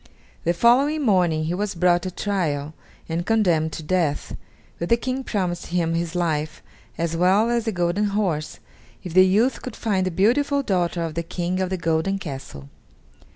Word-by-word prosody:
The 170 - +3
following 275 - +3
morning 180 - +2
he 160 +2 -1
was 205 +1 -2
brought 175 0 +3
to 185 - -4
trial 160 -7 -2 0.3
and 165 +1 -2
condemned 175 -7 +2
to 160 - -6
death, 160 -3 -1 0.4
but 170 - -3
the 235 - +5
King 255 +2 -3
promised 180 -7 -2
him 170 -1 0
his 170 0 -2
life, 155 -3 -1 0.3
as 170 0 -1
well 190 +7 +3
as 235 -1 0
the 225 - 0
golden 175 +2 0
horse, 195 -7 -1 0.5
if 180 -4 -7
the 185 +1 +7
youth 220 +8 +2
could 255 - -7
find 190 -5 0
the - - +1
beautiful 275 - +2
daughter 175 -5 0
of 165 -1 -4
the 170 - -2
King 175 +2 -3
of 185 - -1
the 190 - -2
golden 165 +3 0
castle. 135 - -8
180 Hz, 180 wpm, -23 LUFS, 165-210 Hz, 0.5 s, the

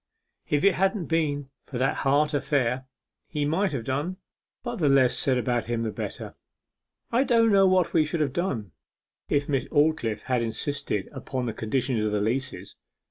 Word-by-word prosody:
If 145 0 +1
it 200 - +5
hadn't 195 0 +1
been 145 -4 -1 0.2
for 130 - -5
that 130 +2 +1
heart 145 +3 +2
affair, 135 -3 0 0.4
he 150 -2 -2
might 175 +5 +1
have 135 -5 -3
done 145 +9 -2 0.5
but 240 -1 -4
the 150 -5 +2
less 135 -2 +4
said 130 -2 +2
about 120 -1 0
him 120 -1 -1
the 110 - -2
better. - - -6 0.8
I 240 +3 +3
don't 230 -4 +4
know 195 -1 +6
what 185 -2 +2
we 160 - +5
should 155 +1 -2
have 140 -4 0
done 130 - -2 0.6
if 145 0 +1
Miss 135 -4 0
Aldclyffe 145 -8 +1
had 125 -2 0
insisted 115 -1 -2
upon 130 -2 -4
the 115 - -2
conditions 120 +1 -1
of 105 - 0
the 105 - +1
leases. 130 +6 -3
140 Hz, 180 wpm, -26 LUFS, 125-165 Hz, 0.8 s, know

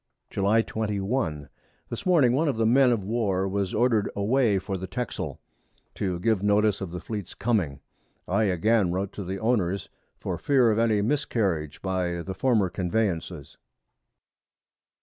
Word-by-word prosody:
July 105 +3 +2
21. 100 - -2 0.4
This 200 - -5
Morning 150 -10 +5
one 155 +5 +2
of 140 - +1
the 110 - +2
Men 125 +3 +5
of 115 -5 0
War 100 -3 0
was 95 -1 -1
order'd 115 -2 +2
away 110 +1 +2
for 95 +1 -3
the 95 0 -5
Texel, 125 +3 -4 0.5
to 90 -3 -2
give 110 0 +1
notice 105 0 +2
of 95 - -4
the 90 +1 -6
Fleet's 105 -4 -6
coming; 95 - -1 0.5
I 110 - +2
again 100 +1 +2
wrote 95 +2 -2
to 100 - -5
the 95 +2 -4
Owners, 100 -5 0 0.3
for - - -4
fear 130 -5 +3
of 110 - +1
any 110 -3 +2
Miscarriage 105 - -1
by 90 -2 -1
the 95 - -5
former 110 -2 +2
Conveyances. 90 -4 -2
100 Hz, 150 wpm, -26 LUFS, 95-115 Hz, 0.5 s, Morning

